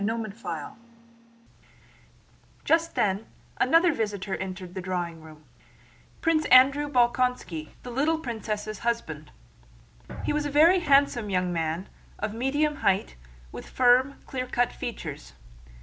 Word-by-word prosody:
CHAPTER 225 Hz, +2 st, -1 dB
IV 195 Hz, -8 st, -6 dB, 2.0 s
Just 330 Hz, 0 st, +2 dB
then 200 Hz, +1 st, 0 dB, 0.3 s
another 330 Hz, +5 st, +4 dB
visitor 205 Hz, -5 st, -3 dB
entered 185 Hz, -1 st, -6 dB
the 190 Hz, -, -5 dB
drawing 175 Hz, -3 st, -4 dB
room: 155 Hz, -1 st, -14 dB, 0.8 s
Prince 325 Hz, -2 st, +2 dB
Andrew 275 Hz, +3 st, +6 dB
Bolkónski, 240 Hz, -, +1 dB
the 245 Hz, -, -7 dB
little 295 Hz, +6 st, +1 dB
princess' 215 Hz, -6 st, -4 dB
husband. 235 Hz, 0 st, -3 dB, 0.9 s
He -, -, 0 dB
was 295 Hz, 0 st, -1 dB
a -, -, -4 dB
very 325 Hz, +6 st, +5 dB
handsome 280 Hz, -8 st, +3 dB
young 180 Hz, -2 st, 0 dB
man, 165 Hz, +2 st, -2 dB, 0.3 s
of 210 Hz, 0 st, -3 dB
medium 290 Hz, +5 st, 0 dB
height, 190 Hz, -, 0 dB, 0.4 s
with -, -, -9 dB
firm, 255 Hz, +2 st, +3 dB
clearcut 255 Hz, -2 st, -1 dB
features. 155 Hz, -, -7 dB
235 Hz, 120 wpm, -26 LUFS, 190-280 Hz, 2.0 s, Andrew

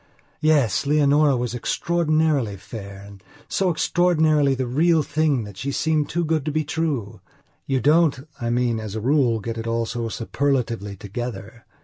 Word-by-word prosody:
Yes, 145 Hz, -, +2 dB
Leonora 145 Hz, -1 st, +3 dB
was 120 Hz, -1 st, -2 dB
extraordinarily 155 Hz, -4 st, 0 dB
fair 100 Hz, +1 st, -9 dB
and 100 Hz, -1 st, -13 dB, 0.3 s
so 190 Hz, -1 st, 0 dB
extraordinarily 160 Hz, -4 st, +2 dB
the 130 Hz, 0 st, -2 dB
real 155 Hz, +6 st, +2 dB
thing 150 Hz, -5 st, 0 dB
that 100 Hz, -2 st, -10 dB
she 140 Hz, +8 st, -3 dB
seemed 155 Hz, +1 st, 0 dB
too 175 Hz, 0 st, -1 dB
good 155 Hz, -2 st, 0 dB
to 155 Hz, -, -1 dB
be 155 Hz, +1 st, 0 dB
true. 135 Hz, -, -3 dB, 0.5 s
You 135 Hz, -2 st, 0 dB
don't, 150 Hz, 0 st, +3 dB
I 120 Hz, -, -2 dB
mean, 120 Hz, -1 st, +1 dB
as 110 Hz, -1 st, -6 dB
a -, -, -2 dB
rule, 125 Hz, -1 st, +2 dB
get 115 Hz, +2 st, -5 dB
it 115 Hz, -, -5 dB
all 115 Hz, 0 st, 0 dB
so 115 Hz, 0 st, -4 dB
superlatively 115 Hz, -4 st, -2 dB
together. 110 Hz, +2 st, -7 dB
130 Hz, 160 wpm, -23 LUFS, 115-155 Hz, 0.5 s, Leonora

